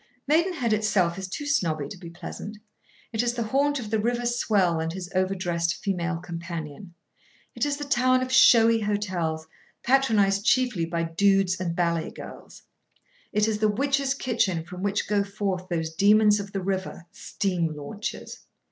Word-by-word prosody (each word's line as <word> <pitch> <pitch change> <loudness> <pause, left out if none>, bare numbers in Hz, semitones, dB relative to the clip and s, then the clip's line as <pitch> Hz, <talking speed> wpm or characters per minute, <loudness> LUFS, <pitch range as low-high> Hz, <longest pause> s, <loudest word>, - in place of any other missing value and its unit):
Maidenhead 310 - +2
itself 205 -5 +1
is 190 - -5
too 250 +10 -6
snobby 165 - 0
to - - -8
be 175 -2 -10
pleasant. 180 +5 -8 0.6
It 220 - +1
is 240 0 -1
the 235 - -1
haunt 280 +5 +1
of 215 -4 -7
the 220 - +1
river 240 +2 -1
swell 205 -8 +1
and 160 0 -2
his 180 +1 -7
overdressed 180 -3 0
female 180 -3 -2
companion. 170 0 -7 0.6
It - - -1
is 285 -1 -1
the 290 - -5
town 255 -1 +2
of 255 - -5
showy 230 -3 +6
hotels, 185 -7 -2 0.4
patronised 215 -7 +3
chiefly 245 -8 +2
by 170 0 -2
dudes 190 +2 +2
and 170 -2 -2
ballet 170 -2 0
girls. - - -11 0.7
It 210 +1 +2
is 215 -1 -1
the 215 0 +3
witch's 275 +4 0
kitchen 210 -11 0
from 180 +1 -9
which 200 0 -1
go 205 -1 +2
forth 195 -2 -3
those 160 -2 -2
demons 210 +3 +5
of 200 0 -6
the 195 -2 -3
river—steam 180 -2 -3
launches. 200 - -6
200 Hz, 160 wpm, -25 LUFS, 175-230 Hz, 0.7 s, showy